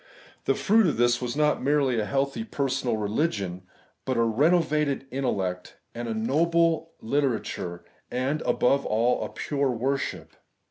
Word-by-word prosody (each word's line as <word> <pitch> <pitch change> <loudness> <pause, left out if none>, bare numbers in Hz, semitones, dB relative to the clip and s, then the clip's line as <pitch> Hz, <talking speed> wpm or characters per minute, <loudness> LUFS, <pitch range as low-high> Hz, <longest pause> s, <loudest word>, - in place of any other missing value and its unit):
The - - +2
fruit 215 -1 +4
of 150 - 0
this 120 +1 +3
was 125 0 -3
not 150 0 +2
merely 135 -3 +2
a 105 - 0
healthy 140 - -1
per 140 -11 -2
sonal 125 -4 -1
religion, 105 - -1 0.4
but 130 -2 -1
a 115 - +4
renovated 150 +3 +2
intellect 95 -9 -2 0.2
and 120 0 -5
a 115 - -2
noble 165 +7 +1
literature, 115 -9 -2 0.2
and, 135 +5 -1
above 140 +3 +2
all, 115 +3 +1
a - - -4
pure 140 -2 -1
worship. 130 +3 -2
135 Hz, 145 wpm, -26 LUFS, 115-150 Hz, 0.4 s, fruit